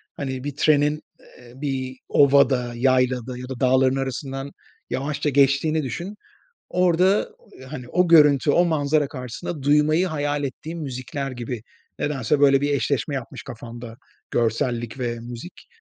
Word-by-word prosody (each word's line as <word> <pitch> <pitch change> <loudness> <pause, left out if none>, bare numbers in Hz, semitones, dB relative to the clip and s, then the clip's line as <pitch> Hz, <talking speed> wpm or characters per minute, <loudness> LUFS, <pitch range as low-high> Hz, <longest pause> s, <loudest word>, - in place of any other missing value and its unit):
hani, 130 -2 -4
bir 145 -1 -5
trenin, 150 0 +2 0.2
eee, 120 -1 -17
bir 130 -2 -3
ovada, 135 -3 +4
yaylada 125 0 +1
ya 125 +1 -8
da 130 - -6
dağların 130 +1 +3
arasından 135 +1 -4 0.4
yavaşça 145 +2 -2
geçtiğini 140 +3 +3
düşün. 170 - -5 0.5
Orada, 180 +2 +2 0.4
hani, 130 -4 -7
o 180 0 +2
görüntü, 150 -3 +6
o 175 +3 +4
manzara 150 -2 +1
karşısında 130 +4 -6
duymayı 150 +5 +3
hayal 145 -2 -2
ettiğim 160 +5 -5
müzikler 135 +1 -5
gibi 120 -2 -5 0.4
nedense 145 -1 0
böyle 140 -1 +5
bir 145 0 0
eşleşme 140 +2 -1
yapmış 130 -3 -6
kafamda 115 0 -9 0.4
görsellik 120 +1 -1
ve 120 -1 -2
müzik. 120 +8 -10
135 Hz, 135 wpm, -23 LUFS, 125-150 Hz, 0.5 s, görüntü